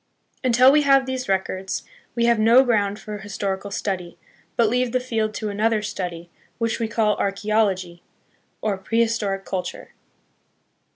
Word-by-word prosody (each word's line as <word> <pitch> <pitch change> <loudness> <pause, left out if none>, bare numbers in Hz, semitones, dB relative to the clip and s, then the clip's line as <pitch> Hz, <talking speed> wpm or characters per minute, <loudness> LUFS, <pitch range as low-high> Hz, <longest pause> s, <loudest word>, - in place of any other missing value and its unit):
Until 255 +1 +6
we 300 +1 +5
have 275 -2 +4
these 260 -3 -4
records, 190 0 -1 0.3
we 235 -1 +2
have 235 -1 +3
no 230 +4 +6
ground 205 -5 +1
for 210 -1 -7
historical 200 0 -4
study, 180 -4 -4 0.4
but 235 - +3
leave 250 +2 0
the 255 - +3
field 220 -4 -2
to 215 - -3
another 215 +1 +1
study, 175 -4 -5 0.3
which 230 -1 -1
we 230 - 0
call 220 -2 +1
Archeology, 195 -3 0 0.6
or 205 -3 -1
Pre 225 +4 -1
historic 210 -4 -1
Culture. 185 -1 -5
215 Hz, 150 wpm, -23 LUFS, 195-235 Hz, 0.6 s, Until